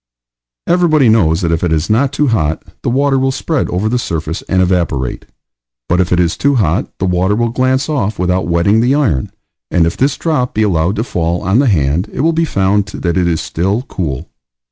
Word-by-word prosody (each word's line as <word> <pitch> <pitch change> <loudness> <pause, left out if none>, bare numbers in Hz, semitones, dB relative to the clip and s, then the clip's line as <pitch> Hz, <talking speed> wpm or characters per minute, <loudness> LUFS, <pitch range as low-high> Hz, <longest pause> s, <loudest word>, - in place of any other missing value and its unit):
Everybody 160 -7 +3
knows 85 -8 +3
that 85 -2 0
if 85 +1 -1
it 85 - 0
is 80 0 0
not 130 +5 +2
too 145 -1 0
hot 80 -9 0 0.2
the - - -1
water 135 +2 +2
will 135 0 +1
spread 150 +2 -2
over 95 +4 -1
the 125 +3 0
surface 80 -5 -3
and 95 - +2
evaporate; 85 -9 -1 0.6
but 85 - +1
if 90 - -2
it 90 - +2
is 85 -1 +1
too 140 0 +1
hot, 95 -5 0
the 95 - -2
water 90 +2 +1
will 120 +1 0
glance 130 +2 0
off 110 -9 -1
without 90 +1 0
wetting 85 +6 +2
the 125 +4 +2
iron, 110 - 0 0.4
and 85 -2 +2
if 85 - -1
this 135 +1 0
drop 150 -7 -1
be 110 - +2
allowed 90 -1 +1
to 110 - -1
fall 85 -6 -2
on 95 +6 +2
the 140 - +3
hand 85 - +1
it - - -3
will 165 +2 +2
be 165 +1 +1
found 100 -5 +1
that 85 -4 -3
it 90 -2 +1
is 80 -2 0
still 95 +8 -1
cool. 80 - -4
95 Hz, 215 wpm, -15 LUFS, 85-130 Hz, 0.6 s, Everybody